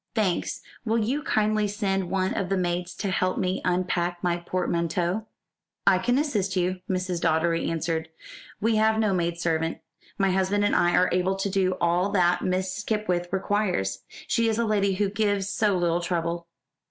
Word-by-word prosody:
"Thanks! 200 Hz, -6 st, 0 dB, 0.2 s
Will 225 Hz, -1 st, +1 dB
you 240 Hz, +7 st, 0 dB
kindly 215 Hz, -5 st, +1 dB
send 195 Hz, -3 st, -1 dB
one 190 Hz, 0 st, 0 dB
of 185 Hz, -, -2 dB
the 195 Hz, -, +1 dB
maids 175 Hz, 0 st, -2 dB
to 200 Hz, -, -2 dB
help 185 Hz, 0 st, 0 dB
me 185 Hz, +1 st, -1 dB
unpack 175 Hz, -1 st, 0 dB
my 175 Hz, -1 st, +1 dB
portmanteau?" 175 Hz, +3 st, -1 dB, 0.6 s
"I 190 Hz, -2 st, +5 dB
can 245 Hz, +7 st, +1 dB
assist 210 Hz, -10 st, 0 dB
you," 185 Hz, 0 st, 0 dB
Mrs. 185 Hz, -2 st, -1 dB
Doddery 165 Hz, +1 st, +1 dB
answered. 160 Hz, 0 st, -2 dB, 0.5 s
"We 225 Hz, +1 st, +2 dB
have 220 Hz, 0 st, +3 dB
no 215 Hz, -3 st, +2 dB
maid 170 Hz, -1 st, -1 dB
servant. 165 Hz, -1 st, 0 dB, 0.4 s
My 195 Hz, -1 st, +2 dB
husband 190 Hz, +2 st, +1 dB
and -, -, +2 dB
I 175 Hz, 0 st, +3 dB
are 180 Hz, -, +4 dB
able 185 Hz, +1 st, +1 dB
to 195 Hz, +1 st, -2 dB
do 185 Hz, -1 st, +1 dB
all 175 Hz, +3 st, +2 dB
that 180 Hz, -2 st, +3 dB
Miss 185 Hz, 0 st, -1 dB
Skipwith 205 Hz, -4 st, -1 dB
requires. 185 Hz, -, 0 dB, 0.3 s
She 230 Hz, 0 st, +1 dB
is 220 Hz, -, 0 dB
a 235 Hz, -, +1 dB
lady 200 Hz, -3 st, +1 dB
who 205 Hz, +1 st, +1 dB
gives 200 Hz, -1 st, 0 dB
so 205 Hz, -1 st, +1 dB
little 175 Hz, -1 st, +1 dB
trouble." 170 Hz, -1 st, -2 dB
185 Hz, 175 wpm, -26 LUFS, 175-205 Hz, 0.6 s, I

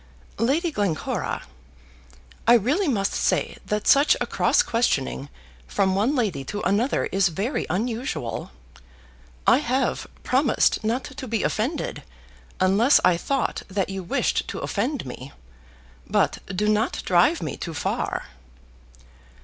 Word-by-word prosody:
"Lady 305 Hz, +9 st, +1 dB
Glencora, 200 Hz, -, -2 dB, 1.0 s
I 240 Hz, -, +8 dB
really 285 Hz, -, +2 dB
must 205 Hz, -7 st, 0 dB
say -, -, 0 dB
that 210 Hz, 0 st, -1 dB
such 280 Hz, +2 st, +5 dB
a -, -, 0 dB
cross -, -, +2 dB
questioning 145 Hz, -, 0 dB, 0.4 s
from 195 Hz, -2 st, +1 dB
one 215 Hz, +9 st, +1 dB
lady 200 Hz, -, 0 dB
to 205 Hz, +9 st, -4 dB
another 210 Hz, +8 st, +1 dB
is 195 Hz, 0 st, +3 dB
very 195 Hz, -, -2 dB
unusual. 220 Hz, -, -3 dB, 1.0 s
I -, -, +6 dB
have 260 Hz, -1 st, -1 dB, 0.2 s
promised 260 Hz, -2 st, +2 dB
not 235 Hz, +4 st, 0 dB
to 270 Hz, 0 st, -8 dB
be 225 Hz, -2 st, -1 dB
offended, 265 Hz, +9 st, -2 dB, 0.6 s
unless 200 Hz, +9 st, +5 dB
I 180 Hz, -1 st, +5 dB
thought 270 Hz, +10 st, -1 dB
that 195 Hz, -1 st, -1 dB
you 195 Hz, 0 st, -4 dB
wished 175 Hz, -, 0 dB
to -, -, -5 dB
offend 245 Hz, -, -2 dB
me. 130 Hz, +1 st, -8 dB, 0.8 s
But -, -, +1 dB
do 195 Hz, +2 st, -1 dB
not 215 Hz, +2 st, +1 dB
drive 185 Hz, -, +3 dB
me -, -, -3 dB
too 165 Hz, -2 st, -6 dB
far." -, -, -2 dB
215 Hz, 130 wpm, -24 LUFS, 190-260 Hz, 1.0 s, I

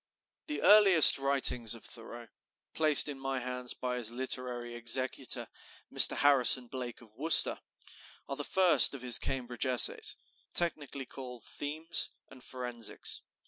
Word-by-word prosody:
The 300 Hz, -, -8 dB
earliest 195 Hz, -9 st, +7 dB
writings 130 Hz, -4 st, +1 dB
of 115 Hz, -, -17 dB
Thoreau, 120 Hz, 0 st, -10 dB, 0.5 s
placed 155 Hz, -2 st, +3 dB
in 140 Hz, -2 st, -9 dB
my 135 Hz, 0 st, -7 dB
hands 125 Hz, 0 st, -5 dB
by 125 Hz, -1 st, -7 dB
his 115 Hz, -3 st, -3 dB
literary 125 Hz, -1 st, -5 dB
executor, 125 Hz, +2 st, -2 dB, 0.5 s
Mr. -, -, +5 dB
Harrison 135 Hz, -3 st, +1 dB
Blake 125 Hz, -1 st, -11 dB
of 110 Hz, -3 st, -22 dB
Worcester, 155 Hz, +8 st, +2 dB, 0.7 s
are 140 Hz, -, -8 dB
the 145 Hz, -, -7 dB
first 180 Hz, -3 st, +2 dB
of 130 Hz, -, -13 dB
his 125 Hz, -2 st, +3 dB
Cambridge 125 Hz, -1 st, -4 dB
essays, 125 Hz, -1 st, +3 dB, 0.4 s
technically 145 Hz, -5 st, -2 dB
called 125 Hz, -3 st, -13 dB
"themes" 155 Hz, +3 st, -4 dB, 0.2 s
and 130 Hz, -2 st, -18 dB
"forensics." 125 Hz, -3 st, -5 dB
130 Hz, 135 wpm, -27 LUFS, 120-145 Hz, 0.7 s, earliest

